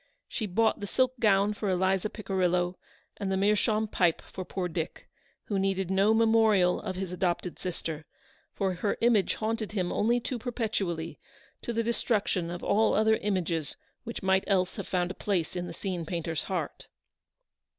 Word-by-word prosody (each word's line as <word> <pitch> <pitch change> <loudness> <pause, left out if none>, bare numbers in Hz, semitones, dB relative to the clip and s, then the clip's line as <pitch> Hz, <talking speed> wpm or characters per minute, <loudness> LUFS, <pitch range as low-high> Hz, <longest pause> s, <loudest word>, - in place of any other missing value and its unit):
She 220 - -3
bought 220 +4 +2
the 205 - -4
silk 255 +4 +2
gown 205 -2 +4
for 205 -1 -3
Eliza 190 +2 +1
Pici 200 -3 -5
rillo, 180 -1 +2 0.4
and 195 -2 -2
the 190 - +1
meerschaum 210 +2 +2
pipe 175 -5 +1
for 185 - -7
poor 185 0 -3
Dick, 165 -1 -4 0.4
who 200 -2 -1
needed 190 -1 0
no 195 +3 +4
memorial 220 -5 +4
of 190 -3 -4
his 185 -1 -4
adopted 180 0 -1
sister; 160 -3 -4 0.4
for 190 -2 -1
her 200 +3 -1
image 230 -4 +3
haunted 220 -1 -2
him 185 -4 0
only 235 +3 +2
too 245 +1 -4
perpetually, 210 -9 -2 0.4
to - - -3
the 230 0 0
destruction 210 -6 0
of 175 0 -6
all 215 +2 +3
other 220 +1 +4
images 175 -6 -1 0.3
which 230 -3 -6
might 190 0 +3
else 185 -3 +2
have - - -5
found 180 -1 0
a - - -5
place 190 -5 -1
in 175 0 -3
the - - -6
scene 180 -2 -3
painter's 165 -2 -2
heart. 190 - -4
195 Hz, 170 wpm, -29 LUFS, 180-215 Hz, 0.4 s, gown